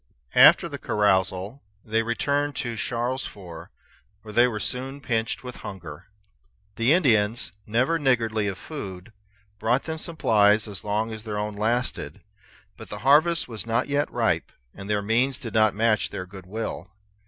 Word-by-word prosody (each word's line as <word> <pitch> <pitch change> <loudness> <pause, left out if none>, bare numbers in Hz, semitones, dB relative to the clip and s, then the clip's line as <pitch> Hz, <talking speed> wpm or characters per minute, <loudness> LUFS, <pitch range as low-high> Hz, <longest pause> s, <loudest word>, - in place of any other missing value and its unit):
After - - +7
the - - -7
carousal 95 +3 0 0.2
they 115 +1 +1
returned 140 +5 -1
to 120 -2 -3
Charlesfort, 115 -9 -4 0.5
where 105 -1 -10
they 120 +3 +5
were 110 -4 -3
soon 130 +5 -3
pinched 115 -2 -2
with 125 -1 -8
hunger. 85 -7 -9 0.7
The 115 +4 +2
Indians, 115 - +3 0.2
never 125 +10 +1
niggardly 115 -6 +1
of 95 -2 -3
food, 100 - -8 0.5
brought 120 +5 +1
them 160 -1 -5
supplies 110 - +3
as 100 -4 -7
long 105 +2 -1
as 110 -1 -7
their 105 -2 -4
own 105 0 -2
lasted; 115 +5 -2 0.6
but - - -11
the - - -5
harvest 160 +5 +4
was 115 -2 -6
not 115 +5 0
yet 145 +1 0
ripe, - - 0 0.2
and 95 +1 -9
their 105 -1 0
means 120 +5 +1
did 115 - -7
not 110 -2 +3
match 110 0 +2
their 90 - -5
good 95 -1 -12
will. 110 +3 -5
115 Hz, 155 wpm, -25 LUFS, 105-130 Hz, 0.7 s, After